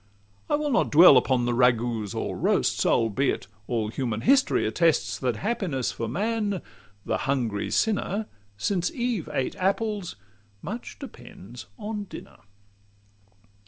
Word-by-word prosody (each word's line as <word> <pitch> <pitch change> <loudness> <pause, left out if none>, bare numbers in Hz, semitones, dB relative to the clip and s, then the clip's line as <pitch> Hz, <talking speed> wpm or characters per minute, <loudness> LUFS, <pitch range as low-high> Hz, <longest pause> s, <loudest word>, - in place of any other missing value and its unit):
I - - +3
will 295 -1 -1
not 235 - +2
dwell 160 -1 +8
upon 125 -1 +3
ragoûts 120 -3 +1
or - - -3
roasts, - - +1
Albeit 115 +4 +1 0.2
all 110 -3 -1
human 115 -2 -3
history 275 +1 +3
attests 130 - +1
That 125 -3 0
happiness 185 - -2
for 115 - -4
man 205 - -1 0.4
the - - 0
hungry 120 -7 -1
sinner! 215 -1 0 0.3
Since 180 - 0
Eve 240 - -2
ate 135 -3 -2
apples, 200 0 -1 0.5
much 220 +8 -6
depends 120 - -11
on 210 -2 -5
dinner. - - -11
155 Hz, 125 wpm, -26 LUFS, -, 0.5 s, dwell